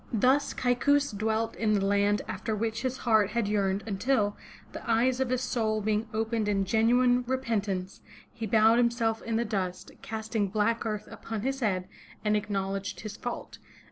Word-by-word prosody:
Thus 260 +6 +2
Kaikous 285 +3 +2
dwelt 220 +2 -1
in 215 -2 +2
the 195 -1 +1
land 205 +1 +2
after 220 -2 -3
which 220 +1 -2
his 260 0 -2
heart 220 -4 +3
had 235 -3 0
yearned 200 -1 0
until, 210 0 +1 0.4
the - - -7
eyes 245 +3 +3
of 265 -2 0
his 255 0 0
soul 220 -3 0
being 215 +1 0
opened 220 0 -1
in 195 -2 +1
genuine 245 +4 +3
repen 245 -4 0
tance, 190 -1 -4 0.3
he 225 - -4
bowed 220 +2 +5
himself 235 -2 +1
in 230 - -3
the 235 +1 +1
dust, 190 -4 -3
casting 220 -1 -2
black 225 +3 0
earth 210 -1 -3
upon 225 -2 -5
his 270 +1 -1
head, 185 -6 0 0.4
and 210 0 +3
acknowledged 195 -1 -2
his 210 -1 -6
fault. 245 +1 -6
220 Hz, 170 wpm, -28 LUFS, 205-235 Hz, 0.4 s, bowed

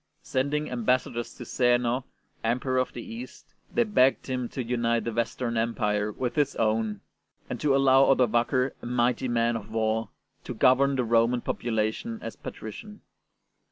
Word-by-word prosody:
Sending 145 +3 -1
ambassadors 120 -1 0
to - - -8
Zeno, 125 0 +1 0.4
Emperor 130 +3 0
of 130 - 0
the - - -7
East, 235 +2 -10 0.2
they 240 - +3
begged 135 - +3
him 125 -2 -3
to 130 - -4
unite 115 -1 0
the 115 - -3
Western 115 +1 -1
Empire 105 -2 0
with 125 +3 -3
his 145 -2 +1
own, 110 -2 0 0.5
and - - -4
to 145 -2 +3
allow 135 0 +5
Odovaker, 125 +1 +2
'' - - -36
a - - -9
mighty 125 +1 +1
man 120 -1 +1
of 110 -1 -6
war," 110 0 0 0.3
to - - -6
govern 135 +2 +4
the 130 - +1
Roman 115 +1 +2
population 115 - -2
as - - -6
patrician. 210 -2 -9
120 Hz, 160 wpm, -27 LUFS, 115-130 Hz, 0.5 s, allow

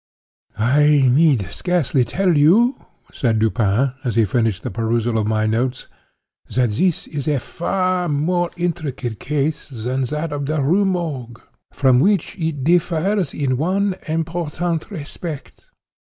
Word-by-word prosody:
"I 140 +4 +4
need 140 - +3
scarcely 170 -8 0
tell 180 +6 +1
you," 200 - +3 0.3
said 115 -4 0
Dupin, 110 +3 +1
as 120 -5 -2
he 115 - +4
finished 110 -1 0
the 125 - -4
perusal 115 +2 -1
of 105 - -1
my 110 0 +1
notes, 120 +4 -1 0.7
"that 125 -3 +2
this 175 - 0
is 145 -2 -5
a 150 -2 +2
far 185 +4 -1
more 170 +4 0
intricate 150 - -3
case 150 +1 -2
than 130 +1 -2
that 150 +4 -3
of 140 -1 -3
the 155 +1 0
Rue 175 +9 +2
Morgue; 150 -11 -3 0.3
from 130 -3 +3
which 195 +2 +1
it 160 -5 -2
differs 175 +4 +1
in 130 -3 -1
one 190 +6 +1
important 165 +1 -2
respect. 155 -4 -8
145 Hz, 140 wpm, -20 LUFS, 125-175 Hz, 0.7 s, I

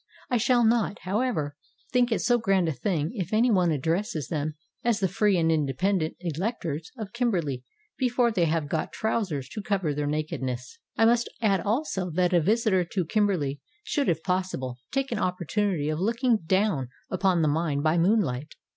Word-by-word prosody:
I 245 - +4
shall 240 +1 +3
not, 225 -3 +2
however, 190 - -1 0.4
think 250 -2 +3
it 225 - +1
so 240 +1 +3
grand 195 -5 +2
a - - +1
thing 155 +3 -1
if 190 -6 -4
any 230 +3 +3
one 180 -4 +3
addresses 160 - -1
them 155 -1 -2 0.3
as 230 -3 +2
the 195 - +2
free 205 +2 +2
and 165 -1 +2
independent 160 +4 0
electors 170 - -3
of 215 -3 -6
Kimberley 175 - -1 0.4
before 245 -2 +2
they 180 -6 +2
have 160 -2 0
got 155 +2 -2
trousers 190 - -1
to 210 - -5
cover 195 -7 0
their 145 0 -2
nakedness. 130 -5 -3 0.2
I 225 - +5
must 235 +1 +3
add 200 -5 +2
also 205 - -1
that 180 0 +2
a 175 - +5
visitor 205 0 +2
to 175 +1 -2
Kimberley 170 -8 0 0.2
should 285 -2 0
if 160 -2 0
possible 180 -10 -2
take 270 0 -1
an 230 - -1
opportunity 180 -3 0
of 155 0 -1
looking 230 +3 +2
down 185 - +1 0.2
upon 185 -3 +2
the - - +3
mine 145 -1 0
by 160 +2 +3
moonlight. 165 - +1
185 Hz, 175 wpm, -27 LUFS, 155-220 Hz, 0.4 s, I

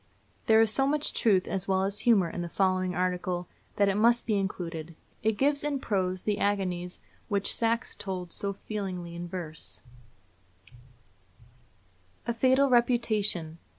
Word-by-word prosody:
There 220 0 +6
is 225 -1 +3
so 270 0 +2
much 300 +1 0
truth 195 -5 +2
as 195 -1 -2
well 190 -1 +2
as 200 +1 -1
humor 205 -6 +4
in 175 - -5
the 175 - -4
following 185 0 +1
article, 180 -1 -1 0.3
that 200 - +3
it 195 - +2
must 235 +3 +4
be 220 - +1
included. 170 -4 -4 0.3
It 220 -1 +1
gives 285 +3 +2
in 290 -2 -1
prose 185 -6 -1
the 210 -1 0
agonies 180 -3 -1 0.3
which 200 -2 0
Saxe 230 +1 0
told 185 -3 -5
so 200 - -1
feelingly 190 -4 -5
in 175 +1 -6
verse: 155 - -6 2.4
A 235 - -1
FATAL 260 +3 +3
REPUTATION. 215 -9 +2
195 Hz, 150 wpm, -28 LUFS, 180-225 Hz, 2.4 s, There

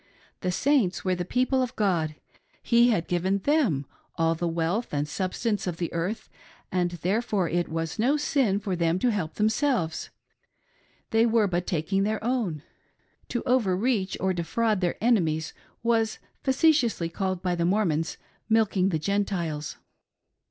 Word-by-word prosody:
The 185 - -1
Saints 245 -4 +1
were 185 - +2
the 175 -1 -2
people 255 +7 +1
of 255 0 -2
God: 170 -7 0 0.3
— - - -38
He 235 +1 +7
had 195 -8 +1
given 185 +3 +1
them 200 - +1 0.3
all 165 0 +2
the 170 +1 -2
wealth 170 +7 -1
and 145 +1 0
substance 200 +5 -2
of 175 -2 -2
the 170 -1 -3
earth, 175 +6 -3 0.4
and 180 -1 +1
therefore 205 -1 +1
it 175 +1 -1
was 165 +1 -3
no 265 +7 +3
sin 265 -9 +1
for 195 -3 -2
them 170 0 +1
to 240 +6 +2
help 175 -7 -3
them 215 - +2
selves— 220 - 0 1.0
they 225 +1 +4
were 225 -2 +3
but 180 -2 -1
taking 180 +4 0
their 215 +1 -1
own. 220 - -1 0.6
To 240 - -3
over 230 -8 +2
reach 210 -3 0
or 190 0 +1
defraud 195 +5 0
their 175 -1 0
enemies 165 -10 +1 0.3
was 225 -2 +1 0.2
facetiously 265 - +2
called 185 +1 -3
by 180 -1 +1
the 170 -1 -1
Mormons 170 -4 +1 0.2
" - - -39
milking 195 -4 +2
the 165 - 0
Gentiles." 170 -4 -2
190 Hz, 160 wpm, -26 LUFS, 170-230 Hz, 1.0 s, He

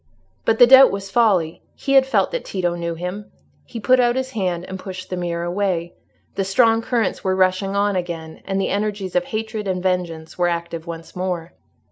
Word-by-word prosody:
But 225 - +2
the 245 - +9
doubt 265 +2 +8
was 195 0 -5
folly: 195 -9 +2
he 275 - -2
had 265 -1 +6
felt 270 - +1
that - - -3
Tito 180 -3 -2
knew 170 -1 -3
him. 180 +5 -6 0.3
He 235 - -7
put 255 +3 +3
out 240 -1 +3
his 260 0 -2
hand 180 -6 -2
and 190 0 -7
pushed 185 -1 -8
the - - -1
mirror 170 -1 -3
away. 175 -1 -1 0.4
The 195 - -1
strong 225 +4 +3
currents 230 -3 -1
were 190 -1 +1
rushing 190 +1 +1
on 200 0 +1
again, 170 -3 -5
and 195 0 -1
the 195 - 0
energies 200 -2 -2
of 180 0 +2
hatred 220 -1 -4
and 185 -1 -2
vengeance 175 -3 -2
were 175 - +3
active 170 -1 -4
once 165 -1 -8
more. 180 -2 -3
190 Hz, 200 wpm, -21 LUFS, 175-215 Hz, 0.4 s, the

